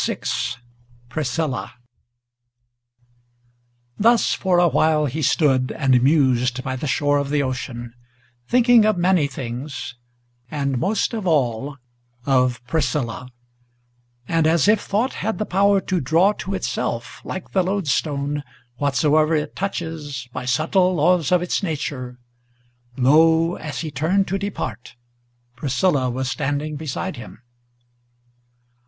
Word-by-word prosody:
VI - - -1 0.9
PRISCILLA 145 +1 -2 2.3
Thus 230 +3 +4
for 185 -2 +1
a 175 0 +5
while 155 -1 +2
he 145 +3 -3
stood, 135 -3 +2
and 130 -5 +3
mused 130 -3 +2
by 130 -1 -3
the 140 +4 -4
shore 145 +3 +2
of 140 -1 -3
the 145 0 +1
ocean, 125 -2 -5 0.5
Thinking 245 -2 +5
of 215 -2 +2
many 175 -4 +3
things, 130 +1 -6 0.6
and 140 -3 -1
most 200 - 0
of 215 -5 -3
all 140 -3 0 0.5
of 125 -3 +1
Priscilla; 130 -3 -2 1.0
And 165 -2 +2
as 160 -2 +3
if 210 0 +4
thought 220 +6 -1
had 220 +2 -1
the 215 - -2
power 200 +1 +3
to 185 -1 -1
draw 165 +9 +3
to 195 -1 -5
itself, 120 -5 -3
like 185 - -6
the 190 - +2
loadstone, 150 -6 -1 0.4
Whatsoever 150 +3 +2
it 150 -1 -2
touches, 160 -9 -4
by 130 -1 -5
subtile 180 +8 +2
laws 170 0 +2
of 180 -1 +3
its 180 - -1
nature, 140 -8 -4 0.8
Lo! 160 +5 +4
as 145 -6 -5
he 155 - -5
turned 170 +8 +1
to 195 +2 -1
depart, 130 - -5 0.6
Priscilla 135 +1 +1
was 130 +2 -3
standing 145 +3 -2
beside 155 +4 -4
him. 120 +1 -11
150 Hz, 125 wpm, -22 LUFS, 130-180 Hz, 2.3 s, a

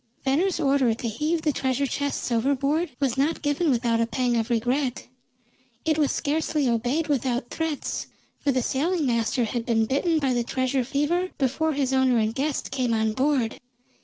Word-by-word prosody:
Venner's 325 +7 +1
order 270 -5 +2
to 235 - -4
heave 305 +9 -1
the 305 - +2
treasure 265 +1 0
chests 285 -1 -2
overboard 280 +7 +1
was 270 -2 0
not 300 +4 0
given 290 +3 +1
without 235 -3 +2
a 230 - +1
pang 245 0 0
of 225 0 0
regret. 245 +3 0 0.8
It 315 -1 +2
was 290 -3 +3
scarcely 305 -1 0
obeyed 245 +7 0
without 260 -3 -1
threats; 320 -3 -3 0.3
for 285 - +1
the 255 -2 0
sailing 315 +6 0
master 235 0 +1
had 230 +1 -2
been 225 -2 +2
bitten 300 +7 +1
by 275 -4 +1
the 240 -1 +1
treasure 260 +2 0
fever 300 +8 0
before 305 +4 0
his 270 -2 0
owner 260 -2 +3
and 220 0 +1
guest 280 +3 -2
came 245 -3 0
on 220 0 +1
board. 260 -2 0
265 Hz, 175 wpm, -25 LUFS, 240-295 Hz, 0.8 s, was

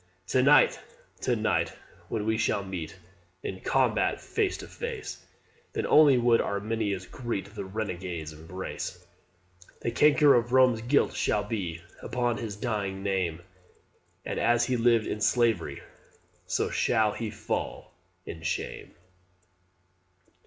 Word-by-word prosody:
"To 130 - +3
night, 140 +1 +5 0.4
to - - +1
night, - - 0 0.4
when 105 -2 -2
we 110 0 +1
shall 100 -2 0
meet 90 -4 -6 0.5
In 95 - -4
combat - - +1
face - - -1
to - - -9
face, - - -6 0.5
Then - - -1
only 150 -4 +6
would 120 -1 +4
Arminius 100 -2 -2
greet 100 -3 -5
The 105 - -5
renegade's 90 -6 -4
embrace. 90 +2 -7 0.8
The 115 - -1
canker 145 +3 +5
of 120 +1 +1
Rome's 130 -3 +5
guilt 125 +5 +2
shall 105 - +1
be 90 -6 -4 0.2
Upon 120 -2 -1
his 105 -2 -5
dying 100 -3 -3
name; 90 -4 -1 0.8
And - - -3
as 120 0 +3
he 130 - 0
lived 115 -2 +3
in 105 - -4
slavery, 115 -5 +1 0.6
So - - 0
shall 110 -1 +2
he 110 +1 -4
fall - - -4 0.3
in 80 - -7
shame. 80 - -4
110 Hz, 130 wpm, -28 LUFS, 95-120 Hz, 0.8 s, only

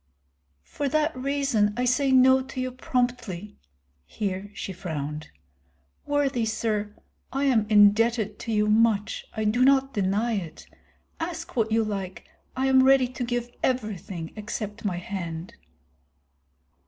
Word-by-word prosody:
"For 285 -1 -3
that 310 +2 +1
reason 255 -6 0
I 250 - +1
say 265 +2 +2
no 260 0 +6
to 260 0 -7
you 255 0 -2
promptly." 245 -6 -3 0.5
Here 200 -1 -4
she 190 - -5
frowned. 150 -4 -5 0.8
"Worthy 280 -4 +1
sir, 215 -1 -2 0.4
I 275 +2 -1
am 235 -6 +3
indebted 215 +1 +4
to 230 - -5
you 210 -1 +2
much, 215 -1 +2
I 220 - 0
do 230 +4 +2
not 270 0 +4
deny 205 +3 0
it. 170 -6 -5 0.5
Ask 335 0 -5
what 220 -2 +1
you 225 0 +3
like, 195 -3 -5 0.3
I 260 +1 0
am 265 -1 +5
ready 265 -1 +5
to 255 0 -5
give 240 0 -2
everything 200 -9 -3
except 210 0 -5
my 190 -4 -1
hand." 175 -2 -5
225 Hz, 135 wpm, -26 LUFS, 205-260 Hz, 0.8 s, no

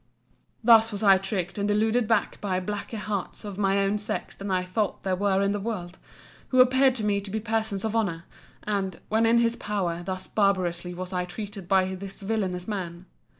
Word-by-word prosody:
Thus 225 -1 +6
was 205 +1 -4
I 195 -2 +7
tricked 195 -1 -3
and 200 - 0
deluded 220 +3 +2
back 225 -2 +1
by 185 -3 0
blacker 205 +4 -4
hearts 210 0 -4
of 205 -1 -6
my 195 -1 +2
own 200 +1 +1
sex 205 - -3
than 200 0 -6
I 185 -1 +1
thought 195 +3 -2
there 190 -1 +1
were 195 0 +2
in 200 - +2
the 205 - -1
world; 185 -4 -5 0.5
who 255 - +2
appeared 260 +1 +5
to 225 - -2
me 205 -1 +1
to 200 - -8
be 220 +3 -2
persons 220 -2 -2
of 220 0 -2
honour; 180 -7 0 0.4
and, 195 -3 -2
when 225 +1 +3
in 230 +1 +5
his 235 0 +3
power, 185 -6 -2
thus 185 +1 -4
barbarously 180 -4 0
was 185 +1 -6
I 180 -1 0
treated 200 +1 -7
by 190 0 +3
this 195 +1 -7
villanous 195 -4 -2
man! 180 -4 -4
200 Hz, 200 wpm, -26 LUFS, 185-220 Hz, 0.5 s, I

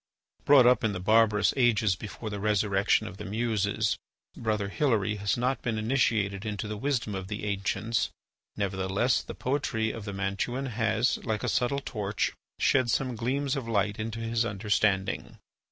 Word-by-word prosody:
Brought 140 -3 +7
up 125 -1 +5
in 110 -2 +1
the 90 - -4
barbarous 110 +1 +4
ages 110 -6 +3
before 105 +3 -7
the 100 - -4
resurrection 105 0 +2
of 95 - -9
the - - -7
Muses, 110 -1 0 0.4
Brother 105 -3 -1
Hilary 105 -6 +1
has 100 +2 0
not 125 +2 0
been 115 -3 -2
initiated 110 -4 +1
into 105 -1 -3
the 105 - -4
wisdom 115 -2 -1
of 95 -1 -4
the 105 +1 -5
ancients; 105 +3 -1 0.5
nevertheless, 100 +4 +1
the - - -8
poetry 120 -5 -1
of 110 -3 -7
the 100 - -4
Mantuan 100 +7 -2
has, 115 +2 +1
like 110 -3 -2
a - - -1
subtle 140 +3 +1
torch, 100 -2 -1 0.3
shed 130 -3 +3
some 125 +1 0
gleams 130 +5 -1
of 135 -4 -4
light 105 -2 0
into 110 +1 -3
his 115 0 0
understanding. 100 -2 0
110 Hz, 165 wpm, -28 LUFS, 100-120 Hz, 0.5 s, Brought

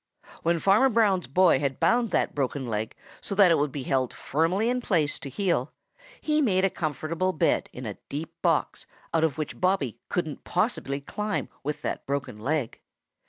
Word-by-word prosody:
When 170 +1 +2
Farmer 200 +10 +4
Brown's 205 - +2
boy 170 +1 +4
had 135 -2 -2
bound 235 0 +3
that - - 0
broken 140 -1 -2
leg 110 -2 -3 0.3
so 200 - -3
that 195 -3 +6
it 165 - +4
would 145 -1 0
be 140 -1 -5
held 130 -1 0
firmly 170 - 0
in 250 +1 0
place 160 -10 +1
to 145 - -7
heal, 180 +6 0 0.5
he 305 0 +1
made 190 -8 +3
a 195 - +1
comfortable 160 +4 -2
bed 155 - +1
in 125 - -8
a 105 -2 -6
deep 150 +3 -5
box - - 0 0.3
out 165 -1 +3
of 160 -3 +1
which 155 - -5
Bobby 180 - +1
couldn't 160 -4 -2
possibly 175 - -1
climb 210 +8 -3
with 150 +2 -4
that - - -3
broken 135 -5 -3
leg. 135 +1 -2
160 Hz, 180 wpm, -27 LUFS, 140-195 Hz, 0.5 s, that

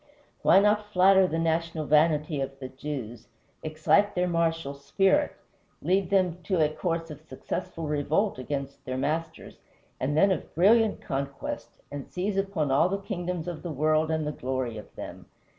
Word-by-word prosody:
Why - - +6
not 210 +1 +2
flatter 190 0 +5
the 165 - -2
national 165 -1 -1
vanity 150 -1 +2
of 135 0 -4
the 130 -1 -7
Jews, 130 -4 -6 0.3
excite 155 +7 +2
their 180 0 +1
martial 165 -4 0
spirit, 190 - +1 0.5
lead 190 +1 +1
them 180 -3 +1
to 185 -1 0
a 155 -1 +4
course 165 -1 -2
of 150 0 -10
successful 160 +1 -5
revolt 150 +5 0
against 140 +1 -5
their 130 -2 -4
masters, 155 +5 -3 0.4
and 145 +3 -1
then 195 +4 +5
of 180 - -3
brilliant 215 +6 +4
conquest, 140 -1 -4 0.2
and 140 -1 -6
seize 195 +2 -2
upon 195 -8 0
all 145 +6 +4
the 195 - -1
kingdoms 180 -4 -4
of 170 -3 -5
the 175 - -5
world 155 +1 +1
and 160 -1 0
the 150 - -1
glory 130 -4 -3
of - - -14
them? - - -9
160 Hz, 165 wpm, -27 LUFS, 145-185 Hz, 0.5 s, Why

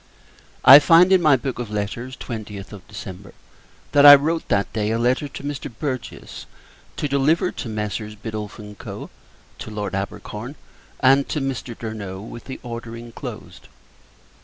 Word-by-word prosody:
I 135 +3 +12
find, 170 +4 +6
in 185 - +5
my 150 -4 +5
book 130 -1 -4
of 120 -3 -4
letters, 105 +5 -4
20th 105 -4 -7
of 100 -3 -12
December, 95 +1 -9 0.6
that 145 - +5
I 145 0 +12
wrote, 160 +4 -1
that 100 -1 0
day, 105 -1 -1
a 115 - 0
letter 125 +5 +1
to 140 - -9
Mr. 145 -3 -5
Burgess, 130 -5 -5 0.5
to 150 - -1
deliver 150 +6 +2
to 125 - -6
Messieurs 105 0 -4
Biddulph 105 -1 -6
and 105 -2 -10
Co. - - -8 0.5
to - - -7
Lord 105 -2 -4
Abercorn 105 +6 -5 0.5
and 135 +1 +4
to 150 - -1
Mr. 135 -3 -4
Durno, 105 -4 -6
with 115 +3 -10
the 130 - -7
order 115 -1 -7
inclosed. 115 0 -9
115 Hz, 160 wpm, -22 LUFS, 105-140 Hz, 0.6 s, I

